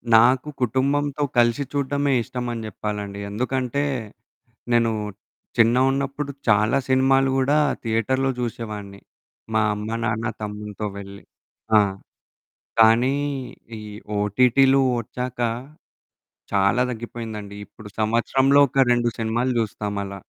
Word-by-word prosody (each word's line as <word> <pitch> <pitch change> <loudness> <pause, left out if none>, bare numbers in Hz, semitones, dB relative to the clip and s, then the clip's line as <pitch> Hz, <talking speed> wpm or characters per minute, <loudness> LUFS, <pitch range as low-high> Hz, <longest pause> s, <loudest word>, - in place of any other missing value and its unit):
నాకు 125 +5 +5
కుటుంబంతో 140 +4 0 0.2
కలిసి 120 +4 +3
చూడడమే 140 0 0
ఇష్టమని 120 -2 -4
జెప్పాలండి. 105 -1 -5
ఎందుకంటే, 130 +5 -1 0.9
నేను 115 -1 +3 0.7
చిన్నగున్నప్పుడు 135 +4 +2 0.2
చాలా 110 +4 +4
సినిమాలు 135 +1 +3
గూడా 135 +3 +2 0.3
థియేటర్‌లో 130 +4 0
జూసేవాడిని. 105 -4 -5 0.5
మా 110 - +4
అమ్మ, 105 +1 -5 0.2
నాన్న, 110 +1 -1 0.2
తమ్మునితో 105 0 -5
వెళ్లి. 100 0 -10 0.6
ఆ! - - +7 1.0
కానీ 115 +5 +5 0.6
ఈ - - -9 0.4
ఓటీటీలు 125 +6 +4 0.2
ఒచ్చాక 125 +1 -5 1.1
చాలా 100 +5 +3
దగ్గిపోయిందండి. 110 -3 -6
ఇప్పుడు 110 -2 -13
సంవత్సరంలో 130 +5 +3
ఒక 135 +1 +3
2 120 0 +1
సినిమాలు 120 +3 0
జూస్తామలా. 100 -2 -3
120 Hz, 95 wpm, -23 LUFS, 105-130 Hz, 1.1 s, ఆ